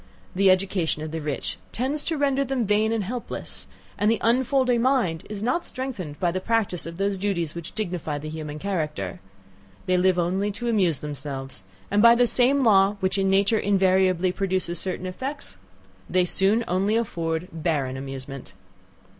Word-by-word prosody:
the 195 0 +4
education 185 -4 +1
of 155 - -5
the 160 0 -4
rich 150 -2 -3
tends 275 +5 -1
to 325 - -1
render 275 -1 +2
them 265 -3 -1
vain 210 +2 +2
and 225 -2 0
helpless, 240 +5 -5 0.3
and 210 - +3
the 225 - +3
unfolding 250 +1 +2
mind 235 -11 +1
is 210 -1 -5
not 255 +9 +1
strengthened 230 - -5
by 175 -2 +1
the 185 - -2
practice 205 -6 0
of 165 0 -8
those 195 0 0
duties 175 -6 -1
which 170 -1 -7
dignify 175 -8 -3
the 150 +1 -7
human 155 -1 -6
character. 150 - -3 0.7
They 185 - +1
only 185 +1 +4 0.4
live 205 - -6
to 240 +2 -3
amuse 185 - +2
themselves, 135 -6 -6 0.3
and 205 +1 +3
by 235 +1 +8
the 245 +1 +4
same 255 +4 +3
law 200 -2 +5
which 190 +1 0
in 195 0 +2
nature 200 +3 +3
invariably 190 -2 +3
produces 185 -3 -1
certain 185 0 -3
effects, 260 - -6 0.5
they 185 0 +3
soon 200 +6 +2
only 195 +4 +1
afford 170 -6 -2
barren 150 -5 -1
amusement. 135 -2 -7
190 Hz, 170 wpm, -25 LUFS, 165-225 Hz, 0.7 s, by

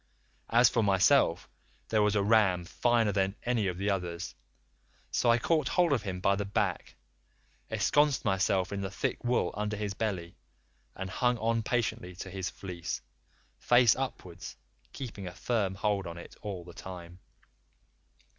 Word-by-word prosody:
As 120 +1 +6
for 115 - +1
myself 95 -3 +3 0.4
there 110 -1 +3
was 105 0 +2
a 100 - +2
ram 100 -5 +3
finer 115 +2 +2
than 95 0 0
any 120 -4 +1
of 90 -2 -2
the 100 +2 0
others, 90 -2 -3 0.8
so 120 - +2
I 115 - +6
caught 155 +6 +1
hold 175 -4 +3
of 135 - +1
him 95 -2 -4
by 100 +1 +3
the 100 - -2
back, 100 -2 -2 0.7
esconced 145 -3 +2
myself 95 -1 +1
in 100 - -3
the 95 - -3
thick 100 - -3
wool 120 0 +1
under 105 0 -2
his 105 -1 -3
belly, 95 -5 -3 0.6
and 95 - -5
hung 125 +3 +1
on 115 +1 +1
patiently 110 -6 -2
to 95 +1 -7
his 95 -1 -3
fleece, 90 -3 -6 0.6
face 120 -2 +5
upwards, 125 -10 -6 0.3
keeping 105 -8 -7
a 90 - -8
firm 105 -6 -1
hold 100 -2 0
on 85 0 -7
it 85 - -11
all 100 -4 -5
the 85 0 -12
time. 90 -1 -9
100 Hz, 160 wpm, -30 LUFS, 95-115 Hz, 0.8 s, As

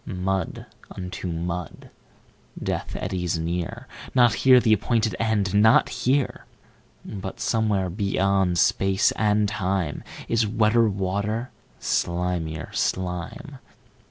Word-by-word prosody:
15Mud 95 -1 -2 0.3
unto 95 +1 -5
mud! 85 +1 -5 0.7
Death - - -3
eddies 90 -2 -2
near 90 +9 -4 0.3
16Not 120 -3 +5
here 130 +1 +6
the 110 -2 +3
appointed 110 0 +1
End, 105 -4 0
not 110 +2 +5
here!17But 120 -6 -4
somewhere, 105 -5 +1
beyond 95 -1 +1
Space 95 +3 +3
and 105 -1 +2
Time.18Is 100 +3 -2
wetter 110 +1 +4
water, 100 +5 -2 0.3
slimier 85 -2 -2
slime! 95 - -3
95 Hz, 95 wpm, -24 LUFS, 90-110 Hz, 0.7 s, here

